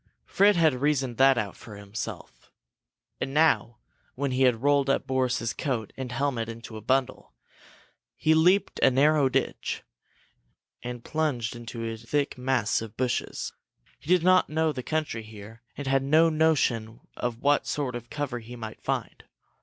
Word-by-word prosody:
Fred 205 +1 +4
had 160 -4 +4
reasoned 135 -5 0
that 135 -1 +5
out 105 -4 -2
for 105 - -12
himself. 100 +1 -8 0.7
And 135 - -4
now, 150 -6 +3 0.4
when 140 +1 -2
he 130 +1 -1
had 125 -2 +3
rolled 140 -1 +3
up 135 - +1
Boris's 130 -4 0
coat 120 -6 -3
and 130 -2 -5
helmet 125 -4 -1
into 115 0 -9
a 110 - -7
bundle, 130 - -1 0.8
he 160 - +2
leaped 180 +5 +3
a - - +6
narrow 140 +1 +3
ditch - - -2 1.0
and 120 -1 -6
plunged 140 -8 -1
into 115 -1 -6
a 115 0 -4
thick 140 +6 -1
mass 125 -5 0
of 110 -2 -9
bushes. 125 -1 -2 0.5
He - - -18
did 180 -1 +4
not 185 0 +4
know 160 +1 +1
the 130 -3 -5
country 155 -4 -2
here, 110 +1 -12 0.2
and 145 - -5
had 135 0 +2
no 155 +4 +4
notion 130 -8 +1
of 120 -2 -3
what 145 +1 +3
sort 140 -4 -2
of 120 0 -7
cover 140 -5 -3
he 120 +2 -10
might 110 -2 -8
find. - - -3
130 Hz, 160 wpm, -27 LUFS, 115-145 Hz, 1.0 s, a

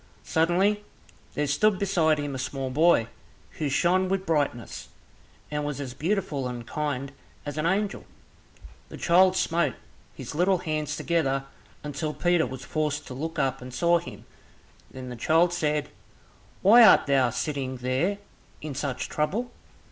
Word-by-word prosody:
Suddenly 185 +6 +2 0.5
there 150 - 0
stood 190 +9 +2
beside 175 -6 +2
him 145 -1 -3
a 130 - -4
small 130 0 -3
boy 155 -4 +4 0.5
who 150 - 0
shone 185 +6 +2
with 195 0 -1
brightness, 145 -8 -2 0.6
and 150 0 -2
was 145 -1 -3
as 135 -3 -5
beautiful 155 -4 -1
and 120 -1 -6
kind 140 0 -3 0.3
as 145 - -5
an 155 +1 0
angel. 200 +3 -1 0.8
The - - -9
child 185 +2 +4
smote 170 +1 +1 0.4
his - - -7
little 180 +4 +2
hands 155 -4 -3
together, 135 -5 0 0.4
until 150 +1 -4
Peter 175 -4 +2
was 130 +1 -8
forced 150 -1 -2
to - - -6
look 160 +5 -5
up 135 -2 0
and 125 +1 -8
saw 170 +6 +3
him. 175 - -11 0.6
Then 130 -1 -8
the 125 - -6
child 165 +8 +3
said, 150 -3 -1 0.7
"Why 230 +5 +8
art 210 - +7
thou 135 -3 +3
sitting 130 -1 -3
there 130 +11 0 0.4
in 150 -2 -6
such 135 -1 -3
trouble?" 205 +12 -2
150 Hz, 150 wpm, -26 LUFS, 135-175 Hz, 0.8 s, Why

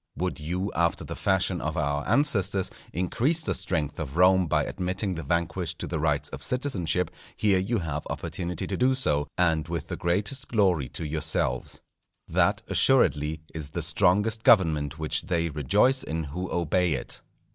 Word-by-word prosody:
Would 90 -2 -2
you, 90 +6 -2
after 85 0 +1
the - - -6
fashion 95 -2 +1
of 80 +3 -3
our 70 -1 0
ancestors, 100 -9 +1 0.2
increase 130 - 0
the - - 0
strength 75 -5 -2
of 75 -1 -5
Rome 90 0 +5
by - - +2
admitting 95 +2 -2
the 80 - -4
vanquished 85 0 -1
to - - -4
the 80 - -3
rights 75 -2 0
of - - -8
citizenship, 95 - -1 0.3
here 100 -3 +3
you 115 +6 0
have 75 -5 -4
opportunity 90 -2 -4
to 100 - -3
do 130 +5 +3
so, 75 - 0
and 80 -3 +2
with 85 0 -4
the - - -3
greatest 105 +10 -1
glory 90 - +2
to 80 +5 -6
yourselves. 75 -4 -1 0.5
That, - - +2
assuredly, 80 - +2
is 75 -3 -5
the 85 +2 -3
strongest 105 +7 +2
government 80 -10 +4
which 80 -1 -1
they 85 -2 0
rejoice 105 - +2
in 80 +1 -3
who 90 +6 -5
obey 85 0 +1
it. 65 - -5
85 Hz, 170 wpm, -27 LUFS, 80-95 Hz, 0.5 s, Rome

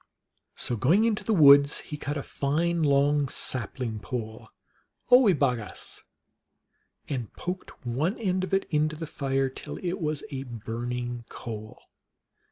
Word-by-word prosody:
So, 120 - -2
going 165 - +3
into 215 -2 0
the 225 - -1
woods, 145 -6 +7
he 150 - -7
cut 145 0 -4
a 140 - -3
fine 165 +5 0
long 145 -1 +3
sapling 120 -3 -3
pole 110 -1 -6 0.6
of 250 - +10
oio 200 - +4
bo 135 -3 +3
goos, 105 -3 -8 1.1
and 125 -6 -4
poked 180 -6 -6
one 145 - 0
end 185 -4 0
of 185 - -4
it 195 0 +2
into 155 0 +1
the 160 +1 -5
fire 135 -2 -1
till 130 - -7
it 180 0 -3
was 155 -2 -1
a 135 -1 -4
burning 120 0 -5
coal. 110 -2 -8
140 Hz, 150 wpm, -27 LUFS, 125-170 Hz, 1.1 s, of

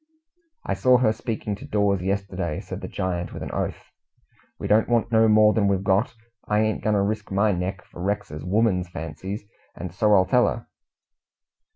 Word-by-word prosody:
"I - - -1
saw 125 -2 +4
her 120 -3 +3
speaking 110 -3 -4
to - - -10
Dawes 100 -2 +1
yesterday," 95 -3 -2
said - - -7
the - - -5
giant, 90 -1 -3
with - - -6
an - - -6
oath. - - -3 0.7
"We - - -7
don't 110 +2 +3
want 120 -1 +1
no 110 0 +5
more 105 0 +5
than 105 -3 +2
we've 95 -1 +1
got. 100 +5 +1 0.3
I 105 0 +2
ain't 110 0 0
goin' 105 -1 +2
to 100 - +2
risk 105 0 -3
my 100 +2 +3
neck 95 +2 -3
for 85 - -11
Rex's 100 -6 -3
woman's 95 -2 +1
fancies, 85 +6 -6 0.3
and 90 0 -7
so 105 +2 +3
I'll 95 -1 +5
tell 125 +2 +3
her." 115 - -3
100 Hz, 190 wpm, -24 LUFS, 95-110 Hz, 0.7 s, no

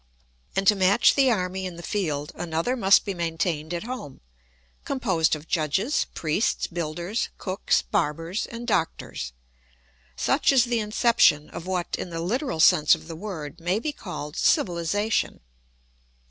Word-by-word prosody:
And 195 - 0
to 210 - +7
match 195 +5 +4
the 270 -2 +4
army 190 -3 -1
in 180 - -8
the 170 - -10
field 150 -9 -2
another 170 +8 -2
must 195 -5 +5
be 200 - -2
maintained 165 -2 -2
at 175 +1 -3
home, 235 - -7 0.6
composed 190 - +1
of 155 +1 -11
judges, 175 - 0
priests, 160 +7 0
builders, 170 +5 -3
cooks, 190 0 0
barbers, 165 0 -1
and 235 0 -7
doctors. 165 - -2 0.8
Such 275 - +2
is 260 -3 +5
the 240 -1 0
inception 210 - +3
of 170 - -8
what, 180 -2 -1
in - - -5
the 165 -1 -5
literal 210 - -2
sense 160 -2 +6
of - - -13
the 165 - -7
word, 160 -6 -7
may 175 +4 0
be 300 +7 -2
called 175 - -7
civilisation. 190 +6 +1
180 Hz, 145 wpm, -25 LUFS, 165-215 Hz, 0.8 s, to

